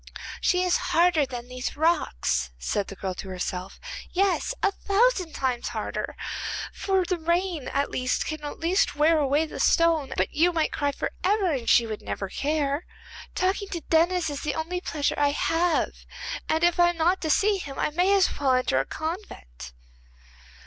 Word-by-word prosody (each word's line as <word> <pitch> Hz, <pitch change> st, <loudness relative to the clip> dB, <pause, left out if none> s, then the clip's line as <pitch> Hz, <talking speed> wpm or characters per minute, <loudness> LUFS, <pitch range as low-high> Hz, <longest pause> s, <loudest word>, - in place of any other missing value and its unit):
'She 360 Hz, -1 st, +2 dB
is 360 Hz, -1 st, +3 dB
harder 330 Hz, -4 st, +3 dB
than 245 Hz, -2 st, -7 dB
these 250 Hz, +2 st, -5 dB
rocks,' 310 Hz, -, +1 dB
said 195 Hz, -, -2 dB
the 195 Hz, -, -8 dB
girl 190 Hz, -1 st, -4 dB
to 190 Hz, -, -8 dB
herself, 185 Hz, 0 st, -5 dB, 0.3 s
'yes, 390 Hz, +4 st, +1 dB
a 400 Hz, -, +4 dB
thousand 395 Hz, -4 st, +1 dB
times 255 Hz, -3 st, -1 dB
harder. -, -, -4 dB, 0.6 s
For 385 Hz, -2 st, 0 dB
the 355 Hz, 0 st, -1 dB
rain 340 Hz, -2 st, 0 dB
at 280 Hz, +1 st, -1 dB
least 255 Hz, 0 st, 0 dB
can 310 Hz, -1 st, -5 dB
at 290 Hz, -, -6 dB
last 345 Hz, +1 st, +1 dB
wear 310 Hz, +2 st, +4 dB
away 290 Hz, +2 st, +2 dB
the 310 Hz, -, -8 dB
stone, 330 Hz, -5 st, +3 dB
but -, -, 0 dB
you 340 Hz, +4 st, +3 dB
might 320 Hz, -2 st, 0 dB
cry 285 Hz, -1 st, 0 dB
for -, -, -4 dB
ever, 390 Hz, -1 st, +2 dB
and 255 Hz, -6 st, -2 dB
she 235 Hz, -, +6 dB
would 215 Hz, -2 st, -5 dB
never 195 Hz, -, -4 dB
care. 290 Hz, -, -1 dB, 0.5 s
Talking 385 Hz, +2 st, 0 dB
to 340 Hz, -3 st, -5 dB
Denis 335 Hz, 0 st, +3 dB
is 285 Hz, -, -5 dB
the 300 Hz, -, -2 dB
only 345 Hz, +3 st, -3 dB
pleasure 295 Hz, -5 st, -1 dB
I 285 Hz, -1 st, +3 dB
have, 335 Hz, +3 st, +1 dB, 0.6 s
and 320 Hz, +1 st, +1 dB
if 345 Hz, 0 st, +3 dB
I 345 Hz, 0 st, +6 dB
am 345 Hz, -, -4 dB
not 350 Hz, +4 st, +2 dB
to 315 Hz, -, -2 dB
see 405 Hz, +5 st, +3 dB
him 275 Hz, -6 st, -7 dB
I -, -, 0 dB
may 360 Hz, +5 st, +2 dB
as 385 Hz, -2 st, +2 dB
well 270 Hz, -3 st, +3 dB
enter 255 Hz, -, +2 dB
a 135 Hz, -, 0 dB
convent. 315 Hz, -, -6 dB
315 Hz, 185 wpm, -26 LUFS, 270-355 Hz, 0.6 s, she